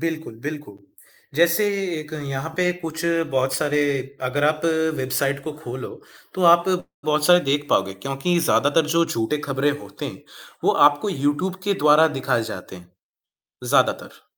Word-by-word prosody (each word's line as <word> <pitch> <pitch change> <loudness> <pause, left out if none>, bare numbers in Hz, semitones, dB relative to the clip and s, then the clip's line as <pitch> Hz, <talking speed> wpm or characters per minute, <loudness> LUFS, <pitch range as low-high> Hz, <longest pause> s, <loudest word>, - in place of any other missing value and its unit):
बिल्कुल, 160 -7 -4
बिल्कुल। 145 -9 -7 0.6
जैसे 170 +6 +3 0.3
एक 155 0 -9
यहाँ 135 +3 -4
पे 180 -1 +2
कुछ 160 0 -5 0.3
बहुत 130 0 0
सारे 145 +2 0 0.4
अगर 135 +3 0
आप 155 +2 +1 0.3
वेबसाइट 135 +1 -1
को 155 - -4
खोलो, 130 -4 -7 0.5
तो 185 - -3
आप 170 0 +6 0.4
बहुत 150 0 +1
सारे 180 0 +7
देख 145 +1 0
पाओगे 95 0 +1
क्योंकि 135 - -1
ज़्यादातर 155 -1 +2
जो 170 - +4
झूठे 150 -2 -2
खबरें 140 +1 +1
होते - - -8
हैं - - -9 0.4
वो - - +4 0.2
आपको 145 +7 -5
यूट्यूब 145 +4 -1
के 200 0 +1
द्वारा 150 +2 +7
दिखाए 125 -3 0
जाते 95 0 -9
हैं, 90 -1 -16 0.7
ज़्यादातर। - - 0
145 Hz, 150 wpm, -22 LUFS, 135-160 Hz, 0.7 s, सारे